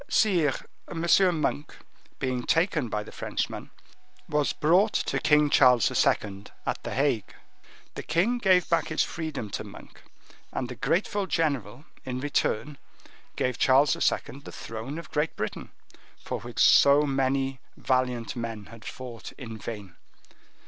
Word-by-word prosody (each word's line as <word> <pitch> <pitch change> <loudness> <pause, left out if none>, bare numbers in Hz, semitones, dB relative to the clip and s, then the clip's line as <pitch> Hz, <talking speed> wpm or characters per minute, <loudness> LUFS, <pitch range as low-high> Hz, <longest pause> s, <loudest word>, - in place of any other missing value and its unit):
"Sire, 175 - +3 0.3
M. 165 0 -3 0.4
Monk, 145 +1 -2 0.4
being 130 -2 -2
taken 160 - +1
by 105 -1 -2
the - - -12
Frenchman, - - -4 0.6
was 150 -1 +1
brought 180 +8 +3
to - - 0
King 150 -1 +4
Charles 125 -4 +5
II., 100 -1 0 0.2
at - - -2
the - - -5
Hague. 130 -8 0 0.6
The - - -5
king 190 +11 +1
gave 185 -5 +4
back 170 - +1
his 155 - +1
freedom 155 -10 -5
to - - -3
Monk, - - -13 0.5
and 125 - -3
the 125 - -6
grateful 195 - 0
general, 140 - -1 0.2
in 125 -1 -4
return, 145 0 -1 0.6
gave 125 -2 -1
Charles 135 +3 +4
II. 135 - -1
the 140 - -11
throne 115 +7 -6
of 170 - -9
Great 150 +2 -1
Britain, 105 - -5 0.5
for - - -5
which - - -10
so 140 +1 +6
many 135 -1 0 0.2
valiant 125 -3 0
men 115 -3 -5
had 115 - -13
fought 125 -3 -8
in 115 -3 -8
vain." 105 -6 -7
135 Hz, 140 wpm, -27 LUFS, 120-155 Hz, 0.6 s, so